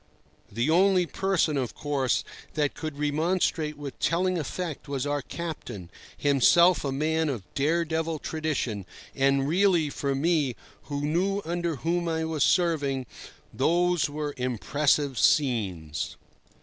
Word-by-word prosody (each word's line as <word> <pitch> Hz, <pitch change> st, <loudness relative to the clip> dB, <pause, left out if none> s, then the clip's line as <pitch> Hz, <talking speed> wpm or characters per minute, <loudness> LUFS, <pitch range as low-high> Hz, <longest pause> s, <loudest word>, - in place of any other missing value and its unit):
The 115 Hz, +6 st, 0 dB
only 185 Hz, +1 st, +4 dB
person, 175 Hz, -5 st, 0 dB
of 130 Hz, -3 st, -2 dB
course, 140 Hz, -4 st, 0 dB, 0.3 s
that 145 Hz, -2 st, +1 dB
could 155 Hz, -3 st, -6 dB
remonstrate 155 Hz, +1 st, 0 dB
with 145 Hz, -2 st, -8 dB
telling 180 Hz, +3 st, +1 dB
effect 160 Hz, 0 st, -5 dB
was 140 Hz, -1 st, -2 dB
our 145 Hz, 0 st, -1 dB
captain, 135 Hz, -, -7 dB, 0.3 s
himself 165 Hz, +6 st, +4 dB
a 140 Hz, -, -1 dB
man 160 Hz, +3 st, 0 dB
of 120 Hz, -8 st, -3 dB
dare 160 Hz, +5 st, +1 dB
devil 160 Hz, 0 st, -1 dB
tradition; 145 Hz, -, -3 dB, 0.3 s
and 135 Hz, 0 st, +2 dB
really, 170 Hz, -2 st, +3 dB
for 140 Hz, -1 st, -2 dB
me, 145 Hz, -4 st, +1 dB, 0.3 s
who 145 Hz, -1 st, -3 dB
knew 190 Hz, +6 st, 0 dB
under 170 Hz, -1 st, -1 dB
whom 170 Hz, +5 st, -1 dB
I 160 Hz, 0 st, -1 dB
was 160 Hz, -3 st, 0 dB
serving, 145 Hz, -7 st, +1 dB, 0.5 s
those 175 Hz, +3 st, +2 dB
were 145 Hz, 0 st, -4 dB
impressive 135 Hz, +2 st, +1 dB
scenes. 95 Hz, -, +1 dB
150 Hz, 130 wpm, -27 LUFS, 135-170 Hz, 0.5 s, only